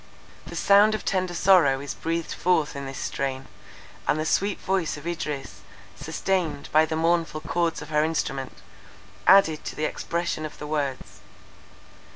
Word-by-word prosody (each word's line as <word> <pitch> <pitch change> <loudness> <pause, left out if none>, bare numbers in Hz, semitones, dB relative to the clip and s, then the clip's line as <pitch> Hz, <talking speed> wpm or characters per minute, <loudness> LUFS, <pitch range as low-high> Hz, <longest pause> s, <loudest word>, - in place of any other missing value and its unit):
The - - -8
soul 205 +2 +5
of 215 - -6
tender 185 -2 -1
sorrow 170 -8 +5
is 140 0 -5
breathed 165 0 -3
forth 165 -5 +1
in 140 -1 -5
this 135 - -7
strain; 135 -1 -3 0.6
and 155 - +2
the 155 - -1
sweet 200 +4 +1
voice 185 -5 -1
of 145 - -11
Idris, 145 - -4 0.3
sustained 160 +1 -2
by 155 +1 +5
the 160 - -2
mournful 165 -1 +1
chords 170 -2 -1
of 150 - -12
her 150 0 +2
instrument, 135 -4 -3 0.6
added 175 -6 +6
to - - -5
the 155 - -1
expression 170 -1 -2
of 155 - -7
the - - -7
words. 145 -3 -3
160 Hz, 160 wpm, -25 LUFS, 145-175 Hz, 0.6 s, added